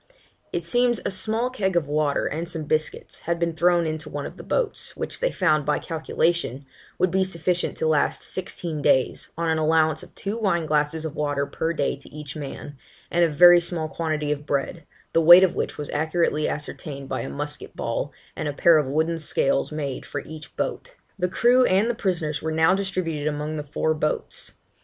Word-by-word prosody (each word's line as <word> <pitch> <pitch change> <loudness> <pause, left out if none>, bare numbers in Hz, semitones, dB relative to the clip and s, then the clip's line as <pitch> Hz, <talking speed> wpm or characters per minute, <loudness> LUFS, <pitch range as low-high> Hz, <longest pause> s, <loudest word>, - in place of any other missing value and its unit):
It 170 -1 -3
seems, 240 +5 +2
a - - 0
small 220 +6 -1
keg 190 -7 -1
of 165 -4 +1
water, 150 -1 +1
and 165 +3 -3
some 160 -3 -3
biscuits, 155 +1 -2
had 170 0 -2
been 170 -1 0
thrown 175 +1 +3
into 155 -1 -4
one 145 -1 -4
of - - -7
the - - -10
boats, - - 0
which - - -4
they - - +1
found, 155 -1 +2
by 150 +1 +1
calculation, 160 -4 -1 0.3
would 185 - +2
be 190 +1 +2
sufficient 180 -1 -1
to - - -1
last 155 -2 +1
sixteen 170 -4 -4
days, 130 -2 +2
on 170 0 -1
an 160 0 +1
allowance 155 0 +2
of - - -14
two 200 +3 -3
wine 180 -6 +1
glasses 155 +1 0
of 160 -1 -5
water 145 -2 0
per 160 +3 -2
day 145 -5 0
to 140 - -16
each 150 -2 -8
man, 145 -1 -7 0.3
and 175 0 +3
a 170 - +4
very 175 +3 +7
small 170 -2 -2
quantity 155 -2 -2
of 150 0 -3
bread, 145 +3 -2 0.3
the 165 - +4
weight 175 +3 +10
of 185 -2 +3
which - - -3
was 150 - -5
accurately 155 0 +1
ascertained 145 -2 -6
by - - -2
a - - -5
musket 70 - -5
ball, - - -2 0.2
and 155 - -3
a 145 - -2
pair 165 +2 +5
of 145 - -1
wooden 160 +4 0
scales 145 -2 0
made 145 -3 -4
for 145 - -5
each 155 +1 -11
boat. - - -3 0.2
The 180 0 +1
crew 245 +6 +4
and 195 +2 +3
the 240 - +1
prisoners 170 -8 -2
were 160 - -2
now 160 +3 +4
distributed 185 -6 -2
among 150 +1 -2
the 150 - -3
four 150 +2 0
boats. 155 0 -2
160 Hz, 205 wpm, -24 LUFS, 150-175 Hz, 0.3 s, weight